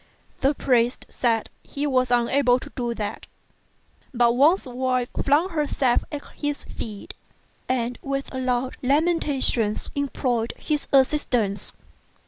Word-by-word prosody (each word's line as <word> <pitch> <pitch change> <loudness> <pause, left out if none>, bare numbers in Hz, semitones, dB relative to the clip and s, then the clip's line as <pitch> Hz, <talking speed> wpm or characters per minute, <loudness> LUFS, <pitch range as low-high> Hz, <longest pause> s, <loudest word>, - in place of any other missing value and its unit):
The 275 +2 +2
priest 245 -2 +1
said 230 -3 0
he 285 +1 -4
was 255 -3 +2
unable 245 +1 +3
to 275 +3 -10
do 240 -2 -2
that; 210 -2 -5 0.8
but 240 -2 +3
Wang's 300 +9 +4
wife 255 -1 -1
flung 295 +6 +3
herself 290 -6 +1
at 290 -1 -5
his 290 -1 -3
feet, 210 -3 -8 0.6
and 245 -1 -1
with 275 0 -4
loud 255 0 -1
lamentations 275 -6 +2
implored 250 -5 -1
his 300 -2 -2
assistance. 255 -7 +1
255 Hz, 115 wpm, -24 LUFS, 240-285 Hz, 0.8 s, Wang's